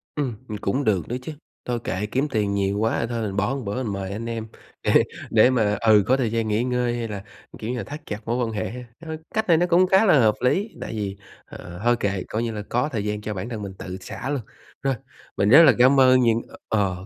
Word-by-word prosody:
Ừm, 135 -6 -2
ừm, 105 - -5
cũng 115 +8 -1
được 100 -7 +1
đó 120 - -3
chứ, 145 - -6 0.3
thôi 120 -1 -1
kệ, 95 +2 -2
kiếm 130 +7 0
tiền 105 -6 0
nhiều 100 0 0
quá 115 +1 +1
thôi 120 -1 -2
mình 100 -3 -3
bỏ 105 +7 0
một 140 - -4
bữa 105 +6 -2
mình 105 -4 -3
mời 95 -1 -4
anh 110 +3 -5
em 115 -1 -4 0.4
để - - +5 0.3
để 110 +2 +5
mà 110 -5 +1
ừ, 110 -3 +5
có 130 - +4
thời 120 -5 0
gian 115 -1 0
nghỉ 110 +2 +1
ngơi 125 -1 0
hay 115 -1 -3
là, 100 -3 -6 0.4
kiểu 110 - -5
như 125 - -3
là, - - -3
thắt 150 +2 -8
chặt 105 - -5
mối 115 +2 -1
quan 115 - -4
hệ 105 -4 -3
ha! 125 +2 -7 0.2
Ơ, 160 -1 -6 0.2
cách 220 0 0
này 170 -3 +5
nó 175 - +3
cũng 180 +1 +4
khá 190 +4 +5
là 155 -9 +6
hợp 110 -3 +4
lý, 195 - +1
tại - - -5
vì, 100 -3 -4 0.3
ờ, 90 0 -10
thôi 120 0 +4
kệ 100 -3 -1
coi 110 +2 -2
như 115 - -2
là 105 -1 -5
có 125 +5 0
thời 110 -5 -2
gian 105 0 -2
cho 105 0 -4
bản 100 +4 -5
thân 110 -3 -5
mình 100 -2 -6
tự 95 0 -6
xả 130 - -6
luôn. 145 -3 -1 0.4
Rồi, 135 -1 0 0.4
mình 100 - +2
rất 145 +8 +9
là 140 -6 +7
cám 130 +3 +5
ơn 130 -1 +6
những 115 -1 +3 0.3
ờ, 110 - +2 0.2
ờ, 90 - -10
115 Hz, 270 wpm, -23 LUFS, 105-130 Hz, 0.4 s, rất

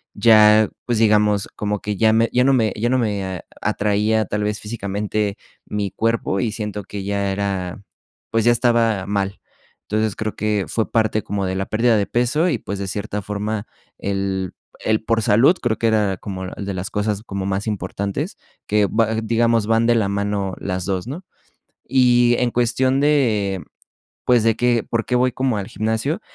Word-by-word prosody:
ya, 110 0 +6 0.2
pues, 120 -2 0
digamos, 105 -2 +3
como 105 -1 -2
que 105 -1 -3
ya 110 +1 +4
me 115 +1 +3
ya 125 0 +4
no 135 - +4
me 115 -4 +2
ya 120 +2 +1
no 130 0 +2
me 100 -5 -2 0.2
atraía, 105 +1 +1
tal 105 +2 -2
vez, 105 0 -1
físicamente 105 -1 -3 0.3
mi 105 -2 -3
cuerpo 115 -3 0
y 115 - 0
siento 105 -2 -4
que 100 +1 -7
ya 100 0 -1
era, 95 -1 -3 0.5
pues 115 0 +1
ya 120 - +6
estaba 115 -5 +2
mal, 100 -1 -2 0.4
entonces 110 -1 -1
creo 110 -1 -3
que, 105 -2 0
fue 110 - -2
parte 110 -1 +1
como 100 -1 -2
de 95 0 -2
la 95 - -1
pérdida 115 +1 +2
de 100 - 0
peso 130 +9 +1
y, 135 - 0
pues, 100 0 -5
de 100 - -3
cierta 105 +1 -4
forma, 105 +2 -3 0.3
el 95 -2 -2 0.3
el 110 0 +1
por 115 0 +1
salud, 115 - +4
creo 115 -3 0
que - - -2
era 105 -4 +1
como 95 0 -6
de 100 +1 -5
las 95 +3 -4
cosas 105 -1 -1
como 100 -3 -4
más 95 +2 -2
importantes, 100 -1 -3 0.3
que 105 -1 +3
va, 110 +1 +1
digamos, 115 -1 +2
van 115 +1 +3
de 120 - +5
la 110 -4 +1
mano 100 -1 -1
las 95 -2 -3
2, 95 +1 -2
¿no? 155 +9 -6 0.6
Y 120 -2 +4
en 125 -1 +1
cuestión 125 +3 +1
de, 110 -11 +1 0.6
pues, 120 -3 +4
de 115 -1 +3
que, 120 -1 +2
¿por 115 -1 0
qué 125 - 0
voy 125 0 +2
como 130 -4 0
al 100 -1 -4
gimnasio?, 110 - -2
105 Hz, 185 wpm, -21 LUFS, 100-115 Hz, 0.6 s, ya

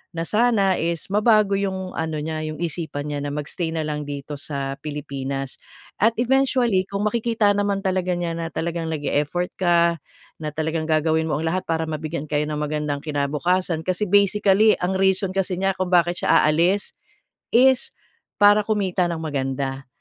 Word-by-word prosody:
na 165 - -2
sana 210 -2 +3
is 165 -1 -2
mabago 210 -1 +4
'yong 190 -2 -3
ano 160 -1 -2
niya 155 0 -3
'yong 155 0 -6
isipan 155 -3 -3
niya 145 - -2
na 145 - -3
mag-stay 155 +3 -3
na 160 - -1
lang 150 -1 -3
dito 145 +1 -6
sa 140 -2 -4
Pilipinas. 135 -2 -5 0.4
At 225 +2 +4
eventually 250 -6 +2
kung 200 +1 -2
makikita 225 -2 +1
naman 200 -1 0
talaga 185 -1 0
niya 175 -1 -2
na 165 0 -3
talagang 165 0 -3
nag-e-effort 150 +3 -1
ka, 170 -2 +3 0.4
na 155 - -2
talagang 160 0 -1
gagawin 160 +1 +2
mo 150 - 0
ang 160 - -3
lahat 185 +3 -1
para 160 0 0
mabigyan 155 0 -4
kayo 150 0 +1
ng 150 - -2
magandang 150 -1 -2
kinabukasan, 160 +4 0
kasi 185 +3 -1
basically 205 +1 +4
ang 185 +1 0
reason 190 0 +2
kasi 190 -1 0
niya 195 0 +1
kung 185 -1 -2
bakit 175 0 +3
siya - - +5
aalis 175 +6 +1 0.6
is 260 +1 +4 0.5
para 205 +1 +6
kumita 190 -4 +1
ng 165 -1 -3
maganda. 135 -2 -3
170 Hz, 165 wpm, -22 LUFS, 150-195 Hz, 0.6 s, para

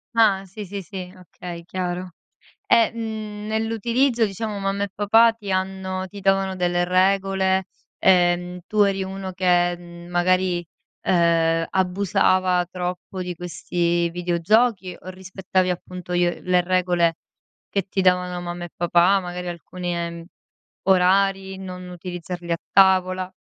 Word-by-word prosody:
Ah, 205 -4 +4
sì, 195 +3 -8
sì, 200 0 -6
sì. 180 -1 -7
Okay 175 -1 -9
chiaro, 180 0 -4 0.6
e, 230 0 +4
mhmm, 215 -2 -5
nell'utilizzo 225 +3 +1
diciamo, 210 +1 -4
mamma 195 0 -1
e 200 - -2
papà 225 +3 +5
ti 215 -3 -8
hanno 190 0 -2
ti 200 +1 -10
davano 195 0 +2
delle 175 -1 +1
regole? 190 +1 +2 0.3
Ehm, 180 -1 +2
tu 215 -1 +2
eri 195 -1 +1
uno 190 0 -6
che, 175 -1 +2
mhmm, 175 0 -12
magari, 180 0 +2 0.4
ehm, 165 -2 +2
abusava 185 -1 +2
troppo 180 +1 -5
di 180 0 -4
questi 175 0 -1
videogiochi? 180 +4 +1
O - - -11
rispettavi, 185 0 -2
appunto, 180 0 -6
i 175 0 +3
o 175 - -2
le 180 0 +3
regole 175 -2 +2 0.6
che 195 -2 0
ti 190 - 0
davano 180 -1 +2
mamma 175 0 -5
e 175 - -9
papà, 175 +3 +4
magari 180 0 -6
alcuni, 175 +1 -5
ehm, 170 0 -4 0.6
orari, 190 +1 +3
non 180 -1 -8
utilizzarli 175 -1 -6
a 170 - +2 0.2
tavola? 185 -1 +4
185 Hz, 135 wpm, -23 LUFS, 175-195 Hz, 0.6 s, papà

